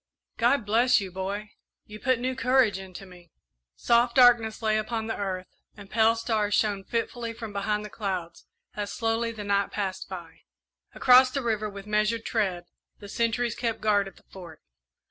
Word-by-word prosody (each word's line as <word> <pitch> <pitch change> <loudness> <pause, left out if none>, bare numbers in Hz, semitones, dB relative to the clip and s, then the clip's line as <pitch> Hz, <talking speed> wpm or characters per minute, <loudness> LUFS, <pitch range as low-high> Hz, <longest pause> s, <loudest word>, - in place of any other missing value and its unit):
"God 240 0 +2
bless 240 +4 +4
you, 195 -2 -6
boy; 200 +3 -5 0.3
you 210 0 -11
put 260 0 +1
new 255 +2 -2
courage 255 -5 +2
into 190 0 -10
me!" 180 -2 -16 0.5
Soft 235 - +2
darkness 240 -3 +5
lay 215 0 +2
upon 220 +1 -3
the 225 - -3
earth, 185 -2 -3 0.3
and 200 -1 -13
pale 225 0 +4
stars 220 -3 0
shone 205 -3 0
fitfully 230 +2 -3
from 225 -2 -8
behind 210 +1 -1
the - - -8
clouds 185 -5 -5 0.3
as 205 -1 -4
slowly 230 0 -1
the 220 -2 -7
night 200 0 +1
passed 195 -3 -4
by. 175 -4 -9 0.6
Across 255 0 +6
the 275 - -2
river, 215 -2 -1
with 200 -1 -10
measured 215 +2 0
tread, 190 -6 -1 0.3
the 205 - -11
sentries 230 +2 0
kept 230 -2 -2
guard 205 -2 +2
at 195 - -12
the - - -21
Fort. 175 -5 -13
215 Hz, 175 wpm, -26 LUFS, 200-230 Hz, 0.6 s, Across